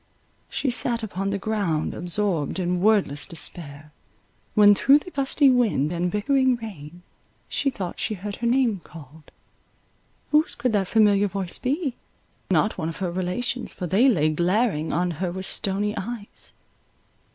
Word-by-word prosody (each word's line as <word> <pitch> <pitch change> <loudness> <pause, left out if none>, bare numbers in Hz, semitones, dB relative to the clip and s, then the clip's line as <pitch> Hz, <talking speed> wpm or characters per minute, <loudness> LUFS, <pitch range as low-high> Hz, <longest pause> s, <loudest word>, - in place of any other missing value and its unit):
She 265 - -1
sat 235 -1 0
upon 195 -2 -3
the 200 - -1
ground 200 -7 -1
absorbed 175 -3 -1
in 180 -1 -1
wordless 200 -9 +2
despair, 150 -2 -6 0.6
when 205 -1 +8
through 270 +7 +5
the 360 +5 -8
gusty 275 0 +2
wind 230 - +3
and 175 +1 -1
bickering 260 +6 +2
rain 175 -7 -9 0.4
she 280 - 0
thought 195 -9 -6
she 215 - -1
heard 200 +2 -6
her 235 - -1
name 235 -6 +2
called. 155 -1 -14 1.0
Whose 305 +2 +3
could 250 -4 -1
that 195 -3 +1
familiar 205 -2 +4
voice 190 -2 -4
be? 275 +1 -1 0.6
Not 210 - +1
one 160 -1 -2
of 165 - -7
her 185 -3 -2
relations, 185 +8 -3
for 180 - -5
they 200 - +4
lay 155 - +3
glaring 175 0 +1
on 175 +3 0
her 180 -2 0
with 190 +1 -5
stony 205 +3 -1
eyes. 210 +1 -7
200 Hz, 150 wpm, -24 LUFS, 175-235 Hz, 1.0 s, when